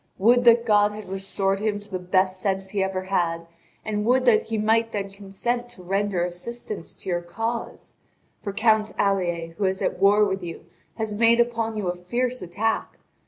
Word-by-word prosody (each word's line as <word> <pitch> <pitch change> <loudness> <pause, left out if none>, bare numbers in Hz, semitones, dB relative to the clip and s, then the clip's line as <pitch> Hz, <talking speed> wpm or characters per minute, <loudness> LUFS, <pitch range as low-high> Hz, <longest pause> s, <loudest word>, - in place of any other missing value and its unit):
Would 245 +5 +4
that 235 0 +6
God 210 -1 +4
had 210 -2 -8
restored 195 0 -1
to 210 - -4
him 210 -1 +1
the 205 -2 -6
best 185 +1 +1
sense 195 -1 -1
he 200 - 0
ever 190 -1 -2
had, 170 -3 -1 0.4
and 210 -1 -1
would 255 +3 +3
that 235 -3 +5
he 225 - -4
might 225 +2 +2
then 200 -2 -3
consent 210 +5 -3
to 215 -7 -12
render 195 -1 0
assistance 200 +2 -6
to - - -8
your 175 -1 0
cause! 225 +7 -5 0.4
For 200 - -4
Count 220 +1 +2
Alier, 175 -4 0
who 200 - +1
is 190 0 0
at - - -1
war 205 +2 +6
with 195 -1 -2
you, 170 -2 -7 0.3
has 220 -2 -3
made 230 +2 +4
upon 230 -2 0
you 205 -3 -2
a 175 - -1
fierce 240 +8 -2
attack. 210 +6 -2
205 Hz, 190 wpm, -24 LUFS, 190-225 Hz, 0.4 s, that